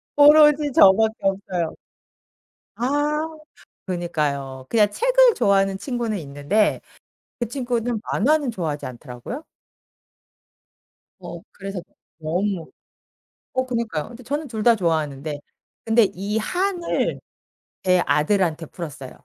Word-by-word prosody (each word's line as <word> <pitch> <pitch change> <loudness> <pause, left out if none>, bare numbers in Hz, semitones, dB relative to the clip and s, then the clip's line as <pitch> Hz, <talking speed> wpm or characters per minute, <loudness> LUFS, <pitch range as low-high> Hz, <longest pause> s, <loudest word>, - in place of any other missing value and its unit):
오로지 295 0 +6
저 195 - +8
밖에 220 +1 +2
없어요. 190 -4 -1 1.0
아 290 +5 0 0.7
그니까요. 145 -7 -3
그냥 210 -3 +4
책을 - - +4
좋아하는 195 -1 +2
친구는 235 -2 -3
있는데 145 +9 0 0.6
그 240 - -1
친구는 240 -3 -2
만화는 285 +3 +2
좋아하지 160 -8 -4
않더라고요. 130 - -8 1.7
어 175 -2 -9
그래서 195 -2 -6 0.4
너무. 175 +3 -2 0.8
어 260 0 0
그니까요. 230 -11 -3
근데 240 +1 -12
저는 290 +5 -3
둘 220 -3 -5
다 235 0 +6
좋아하는데 155 -5 -2 0.5
근데 225 +1 +5
이 200 +3 -3
한을 360 - -1 0.6
제 180 -1 +3
아들한테 165 0 +1
풀었어요. 145 -6 -8
205 Hz, 250 characters per minute, -22 LUFS, 165-250 Hz, 1.7 s, 저